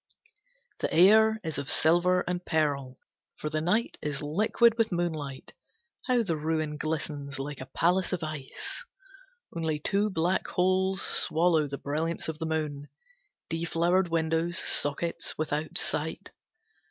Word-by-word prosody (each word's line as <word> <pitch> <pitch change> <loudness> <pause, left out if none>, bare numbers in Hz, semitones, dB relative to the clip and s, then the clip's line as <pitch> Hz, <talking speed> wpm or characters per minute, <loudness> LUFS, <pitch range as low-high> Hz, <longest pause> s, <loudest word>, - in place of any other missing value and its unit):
V - - -37 0.6
The - - -7
air 220 +5 +6
is 160 -4 -3
of 140 - -4
silver 175 +3 +4
and 180 0 -3
pearl, 140 -6 -1 0.4
for 150 - -4
the 155 0 -1
night 195 +8 0
is 150 -1 -3
liquid 215 +9 +3
with 230 -2 +1
moonlight. 155 -6 -3 0.5
How 250 -2 +3
the 170 -6 -1
ruin 155 -1 -1
glistens, 150 -2 -3
like 140 0 -5
a 130 - -7
palace 180 +5 +1
of 180 -3 -2
ice! 155 - -5 0.7
Only 160 -2 -1
two 200 +7 +1
black 175 0 0
holes 190 +1 +1
swallow 160 -2 +2
the 140 0 -5
brilliance 160 +4 -2
of 160 -1 -5
the 160 - -2
moon. 150 -3 -3 0.6
Deflowered 170 +3 +1
windows, 165 +1 0
sockets 165 +3 0
without 155 0 -2
sight. - - -2
160 Hz, 140 wpm, -28 LUFS, 150-180 Hz, 0.7 s, air